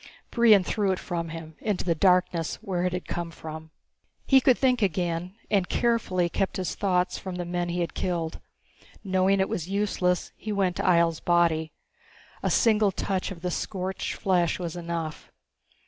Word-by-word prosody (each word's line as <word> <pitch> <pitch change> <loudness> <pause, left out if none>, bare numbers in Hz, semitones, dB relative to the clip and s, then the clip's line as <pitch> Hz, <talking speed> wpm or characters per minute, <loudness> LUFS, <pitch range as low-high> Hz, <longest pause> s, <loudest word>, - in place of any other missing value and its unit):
Brion 225 -5 +6
threw 200 +1 0
it 185 - 0
from 170 -2 -4
him, 160 -1 -8
into 210 -5 -2
the 170 - +2
darkness 180 -1 +2
where 180 -2 -3
it 180 - +1
had 180 - -3
come 175 -1 -3
from. 160 -1 -9 0.6
He 270 -1 +6
could 255 -1 +4
think 255 -3 +2
again, 175 -1 -1 0.2
and 195 -3 +2
he - - -1
carefully 220 -7 +1
kept 190 +2 -1
his 185 -2 -2
thoughts 180 -2 0
from 185 -2 -6
the 175 0 -3
men 175 0 -2
he 175 +1 -1
had 170 - -2
killed. 170 -3 -2 0.6
Knowing 190 0 +2
it 190 - +2
was 170 +1 -4
useless, 195 -3 0
he 215 - -6
went 195 -3 0
to - - -2
Ihjel's 170 -2 +3
body. 165 -2 +2 0.7
A - - 0
single 215 -4 +3
touch 190 0 -2
of 185 -4 -8
the 180 - -1
scorched 190 +2 -3
flesh 180 -3 +1
was 170 -2 -5
enough. 170 -2 -5
180 Hz, 180 wpm, -26 LUFS, 170-195 Hz, 0.7 s, Brion